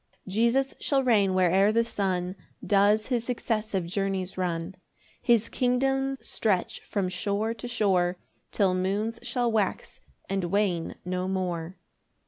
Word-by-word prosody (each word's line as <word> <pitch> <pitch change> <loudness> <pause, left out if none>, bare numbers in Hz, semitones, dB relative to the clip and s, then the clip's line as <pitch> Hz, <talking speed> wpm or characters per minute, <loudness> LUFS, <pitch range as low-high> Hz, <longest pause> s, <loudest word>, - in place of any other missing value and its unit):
1 190 - -8
Jesus 235 +5 +2
shall 275 -2 +1
reign 205 -6 +3
where'er 185 +3 +4
the 230 +1 +2
sun 185 -4 -1 0.3
Does 205 +1 +4
his 245 -3 0
successive 215 -6 -1
journies 190 +1 -2
run; 175 -1 -2 0.5
His 230 -3 +3
kingdom 270 +2 +1
stretch 200 -5 -1
from 200 -3 -2
shore 200 +4 -1
to 230 +2 -7
shore, 185 -6 +1 0.3
Till 195 -3 +2
moons 205 +5 -1
shall 240 -1 0
wax 210 -4 -1 0.3
and 195 -2 -1
wane 180 -2 0
no 180 0 -2
more. 180 -2 -3
200 Hz, 130 wpm, -27 LUFS, 185-230 Hz, 0.5 s, where'er